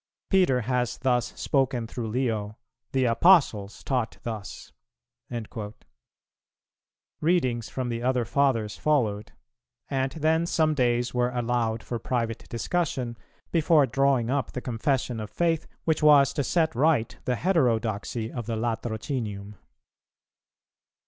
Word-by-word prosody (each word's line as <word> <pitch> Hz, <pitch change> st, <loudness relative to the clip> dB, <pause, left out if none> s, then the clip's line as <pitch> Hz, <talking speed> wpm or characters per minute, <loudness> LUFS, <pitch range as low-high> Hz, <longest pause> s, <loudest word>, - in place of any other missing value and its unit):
Peter 180 Hz, -10 st, +4 dB
has 125 Hz, 0 st, -1 dB
thus 125 Hz, -2 st, +1 dB
spoken 135 Hz, -4 st, +1 dB
through 115 Hz, 0 st, -5 dB
Leo; 110 Hz, -3 st, -2 dB, 0.3 s
the 130 Hz, -1 st, +1 dB
Apostles 115 Hz, -, +3 dB
taught 125 Hz, -4 st, -1 dB
thus." 110 Hz, -3 st, -7 dB, 2.5 s
Readings 130 Hz, -9 st, +1 dB
from 130 Hz, -2 st, -3 dB
the 115 Hz, 0 st, -3 dB
other 125 Hz, -1 st, +1 dB
Fathers 115 Hz, -4 st, +1 dB
followed; 110 Hz, -8 st, 0 dB, 0.6 s
and 135 Hz, 0 st, 0 dB
then 160 Hz, +1 st, +1 dB
some 155 Hz, -2 st, +2 dB
days 120 Hz, -3 st, +1 dB
were 125 Hz, 0 st, +1 dB
allowed 120 Hz, -2 st, -1 dB
for 120 Hz, -, -4 dB
private 115 Hz, -1 st, -3 dB
discussion, 130 Hz, -2 st, -2 dB, 0.4 s
before 160 Hz, -3 st, +4 dB
drawing 130 Hz, -1 st, +1 dB
up 140 Hz, -1 st, -1 dB
the -, -, -3 dB
confession 125 Hz, 0 st, -1 dB
of 105 Hz, -1 st, -5 dB
faith 165 Hz, -, 0 dB, 0.2 s
which 160 Hz, -1 st, +1 dB
was 145 Hz, -2 st, +6 dB
to 145 Hz, -, -1 dB
set 160 Hz, +2 st, +1 dB
right 140 Hz, -2 st, +1 dB
the 125 Hz, -, +1 dB
heterodoxy 115 Hz, -, 0 dB
of 120 Hz, -3 st, -5 dB
the 115 Hz, -, -1 dB
Latrocinium. 110 Hz, -2 st, -3 dB
125 Hz, 120 wpm, -26 LUFS, 115-140 Hz, 2.5 s, was